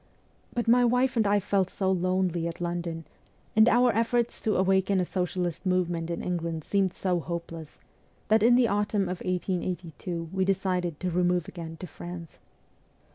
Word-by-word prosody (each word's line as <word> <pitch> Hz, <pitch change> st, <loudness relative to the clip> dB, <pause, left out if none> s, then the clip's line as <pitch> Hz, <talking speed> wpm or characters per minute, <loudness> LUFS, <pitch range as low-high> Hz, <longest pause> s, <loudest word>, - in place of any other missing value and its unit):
But 240 Hz, -1 st, -2 dB
my 245 Hz, +2 st, +5 dB
wife 250 Hz, +2 st, +2 dB
and 220 Hz, -3 st, +3 dB
I 205 Hz, +1 st, +3 dB
felt 195 Hz, -1 st, 0 dB
so 190 Hz, -1 st, -1 dB
lonely 185 Hz, -2 st, 0 dB
at 170 Hz, -, -6 dB
London, 170 Hz, -2 st, -3 dB, 0.5 s
and 220 Hz, +2 st, +7 dB
our 245 Hz, +1 st, +4 dB
efforts 230 Hz, +1 st, 0 dB
to 215 Hz, -, 0 dB
awaken 190 Hz, +1 st, +2 dB
a 180 Hz, -, +1 dB
socialist 180 Hz, -2 st, -2 dB
movement 175 Hz, -3 st, 0 dB
in 170 Hz, -, -3 dB
England 170 Hz, -3 st, -2 dB
seemed 195 Hz, 0 st, +1 dB
so 180 Hz, -2 st, 0 dB
hopeless, 165 Hz, -2 st, -6 dB, 0.5 s
that 220 Hz, 0 st, +4 dB
in 240 Hz, +2 st, +6 dB
the 245 Hz, -1 st, +4 dB
autumn 205 Hz, 0 st, +1 dB
of 180 Hz, -1 st, -4 dB
1882 180 Hz, -2 st, -3 dB
we 190 Hz, 0 st, +1 dB
decided 185 Hz, -4 st, 0 dB
to 180 Hz, -1 st, -1 dB
remove 180 Hz, -1 st, +1 dB
again 165 Hz, -2 st, -8 dB
to 180 Hz, -, -7 dB
France. 175 Hz, -1 st, -9 dB
185 Hz, 165 wpm, -27 LUFS, 170-200 Hz, 0.5 s, and